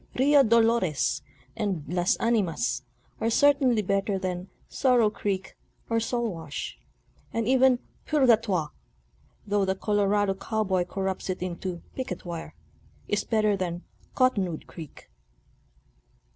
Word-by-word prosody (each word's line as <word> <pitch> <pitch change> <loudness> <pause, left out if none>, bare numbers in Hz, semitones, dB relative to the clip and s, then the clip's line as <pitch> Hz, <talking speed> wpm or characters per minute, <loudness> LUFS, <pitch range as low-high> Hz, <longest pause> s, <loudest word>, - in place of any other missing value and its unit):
"Rio 285 +2 +6
Dolores" 220 - +2 0.3
and 190 -7 -2
"Las 180 +1 +1
Animas" 195 - 0 0.4
are 225 - +1
certainly 265 -3 +4
better 195 +1 0
than 185 -1 -3 0.2
"Sorrow 245 -5 +3
Creek" 195 -3 -3 0.4
or 230 - +3
"Soul 235 -2 -1
Wash," 160 -3 -6 0.5
and 225 -1 -1
even 260 0 +5 0.2
" - - -36
Purgatoire 225 - +3 0.4
"— 65 +4 -36
though 205 -1 +1
the 190 0 +1
Colorado 205 0 +1
cow 220 +3 -2
boy 185 -3 +1
corrupts 190 +1 -3
it 185 -1 -2
into 180 -1 -4
" - - -29
Picket 220 -10 -5
Wire 170 - -6 0.3
"— 75 0 -31
is 205 - -1
better 215 -2 +2
than 175 -2 -3 0.2
" - - -31
Cottonwood 200 - +1
Creek." 160 -4 -11
200 Hz, 135 wpm, -27 LUFS, 180-230 Hz, 0.5 s, Rio